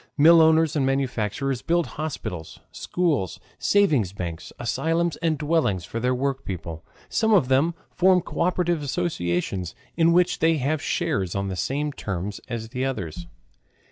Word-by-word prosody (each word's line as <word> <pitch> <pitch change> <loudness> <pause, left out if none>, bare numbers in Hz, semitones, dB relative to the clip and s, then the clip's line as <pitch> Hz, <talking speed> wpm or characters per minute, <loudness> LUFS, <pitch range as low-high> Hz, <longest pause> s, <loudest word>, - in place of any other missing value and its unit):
Millowners 160 0 +6
and 145 - +2
manufacturers 135 -1 -1
build 170 +2 +1
hospitals, 115 - -5
schools, 150 - -1 0.2
savings 150 - +3
banks, 85 -4 -6
asylums, 165 +7 0
and 160 -2 0
dwellings 145 - 0
for 115 - -4
their 125 +2 +1
workpeople. 95 - -4 0.2
Some 220 -1 +2
of 135 -10 +3
them 145 +6 +3 0.2
form 185 0 +4
co - - -8
operative 175 -2 +1
associations 95 - -2 0.2
in 165 0 +4
which 180 +1 +3
they 165 0 +3
have 145 +3 0
shares 95 -2 -1
on 100 0 -1
the 95 - -3
same 145 - -1
terms 100 -3 -4
as 115 -2 -5
the 125 +1 -3
others. 90 - -4
135 Hz, 140 wpm, -24 LUFS, 100-165 Hz, 0.2 s, Millowners